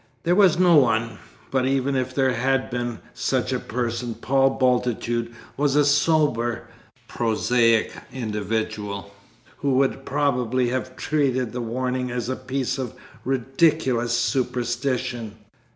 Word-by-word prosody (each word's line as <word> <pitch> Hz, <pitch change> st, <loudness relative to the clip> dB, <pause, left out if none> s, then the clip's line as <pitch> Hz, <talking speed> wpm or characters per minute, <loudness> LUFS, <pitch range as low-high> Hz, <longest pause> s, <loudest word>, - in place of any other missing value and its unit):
There 175 Hz, -, +2 dB
was 190 Hz, -3 st, +5 dB
no 175 Hz, -3 st, +6 dB
one; 115 Hz, -4 st, +2 dB, 0.3 s
but 130 Hz, -1 st, +1 dB
even 135 Hz, 0 st, +1 dB
if 130 Hz, 0 st, -2 dB
there 130 Hz, -2 st, +2 dB
had 130 Hz, +2 st, 0 dB
been 120 Hz, -1 st, -3 dB, 0.2 s
such -, -, -1 dB
a -, -, 0 dB
person, 120 Hz, 0 st, -3 dB
Paul 135 Hz, +3 st, +2 dB
Bultitude 120 Hz, -2 st, 0 dB, 0.3 s
was 145 Hz, 0 st, +1 dB
a 145 Hz, -1 st, +5 dB
sober 145 Hz, -5 st, +2 dB, 0.4 s
prosaic 115 Hz, 0 st, +2 dB, 0.2 s
individual, 105 Hz, -3 st, -3 dB, 0.4 s
who 140 Hz, -2 st, 0 dB
would 135 Hz, 0 st, +1 dB
probably 130 Hz, -4 st, 0 dB
have 130 Hz, 0 st, -3 dB
treated 130 Hz, -6 st, 0 dB
the 125 Hz, -, -4 dB
warning 125 Hz, +2 st, -2 dB
as 120 Hz, -1 st, -3 dB
a 130 Hz, -, -1 dB
piece 130 Hz, +1 st, -3 dB
of 125 Hz, -4 st, -4 dB, 0.3 s
ridiculous 135 Hz, -2 st, +1 dB
superstition. 120 Hz, -1 st, -1 dB
125 Hz, 125 wpm, -23 LUFS, 120-135 Hz, 0.4 s, no